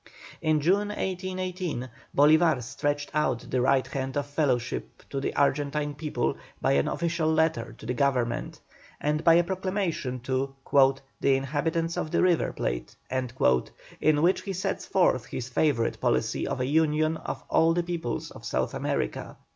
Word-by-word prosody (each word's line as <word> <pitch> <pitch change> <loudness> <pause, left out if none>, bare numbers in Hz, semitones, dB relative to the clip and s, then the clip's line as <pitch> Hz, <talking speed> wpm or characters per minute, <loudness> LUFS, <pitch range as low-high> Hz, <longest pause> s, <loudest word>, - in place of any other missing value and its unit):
In 155 -1 +2
June, 195 +7 +2
1818, 185 -7 -3 0.3
Bolívar 155 -2 +5
stretched 145 +5 -2
out 135 -6 0
the 130 - +2
right 130 +1 +3
hand 135 0 -3
of 145 - 0
fellowship 135 -5 -1
to 140 - -1
the 135 - -3
Argentine 145 +1 +1
people 150 +1 -2 0.2
by - - +1
an 70 +1 +3
official 170 -2 0
letter 160 -6 +1
to - - -12
the 125 - -1
Government, 125 -3 0 0.4
and 150 +1 0
by 165 -1 +7
a 175 - +5
proclamation 185 -8 -2
to 135 +2 -2 0.6
"the 135 - +3
inhabitants 160 +5 -1
of - - -2
the - - +2
River 180 -3 +3
Plate," - - -3 0.2
in 130 - 0
which 180 +3 +3
he 195 - -4
sets 190 +1 -3
forth 130 -11 +2
his 125 0 -5
favourite 130 -3 +1
policy - - +1
of - - -2
a 125 - 0
union 155 +2 +2
of - - -6
all 165 +1 +3
the 175 - +1
peoples 170 -8 -3
of - - -12
South - - -1
America. - - -3
150 Hz, 155 wpm, -27 LUFS, 130-170 Hz, 0.6 s, by